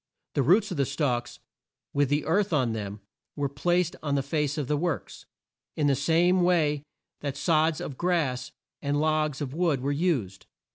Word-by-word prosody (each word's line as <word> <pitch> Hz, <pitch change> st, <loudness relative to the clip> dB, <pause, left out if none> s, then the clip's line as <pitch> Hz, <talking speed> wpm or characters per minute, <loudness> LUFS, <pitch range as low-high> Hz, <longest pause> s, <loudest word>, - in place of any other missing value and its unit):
The -, -, +2 dB
roots 190 Hz, -, +4 dB
of 175 Hz, -, -3 dB
the 140 Hz, -, +2 dB
stalks, 135 Hz, -4 st, -1 dB, 0.6 s
with 140 Hz, -2 st, +2 dB
the 145 Hz, +1 st, +1 dB
earth 195 Hz, +4 st, +1 dB
on 130 Hz, -6 st, +2 dB
them, 105 Hz, -1 st, -5 dB, 0.3 s
were 145 Hz, -1 st, 0 dB
placed 175 Hz, +5 st, 0 dB
on 145 Hz, -2 st, -1 dB
the 140 Hz, -, +1 dB
face 150 Hz, +1 st, -1 dB
of 150 Hz, -, -1 dB
the 150 Hz, -, +1 dB
works, 165 Hz, +2 st, -3 dB, 0.5 s
in 150 Hz, -, +1 dB
the 140 Hz, -, +4 dB
same 170 Hz, +6 st, +3 dB
way 160 Hz, -5 st, +2 dB, 0.4 s
that 140 Hz, -2 st, -4 dB
sods 160 Hz, -2 st, +2 dB
of 135 Hz, -, -6 dB
grass, 150 Hz, -8 st, 0 dB, 0.3 s
and 145 Hz, 0 st, 0 dB
logs 155 Hz, -1 st, +1 dB
of 135 Hz, -2 st, -3 dB
wood 160 Hz, -5 st, +1 dB
were 140 Hz, +2 st, 0 dB
used. 140 Hz, -, -1 dB
150 Hz, 180 wpm, -27 LUFS, 140-165 Hz, 0.6 s, roots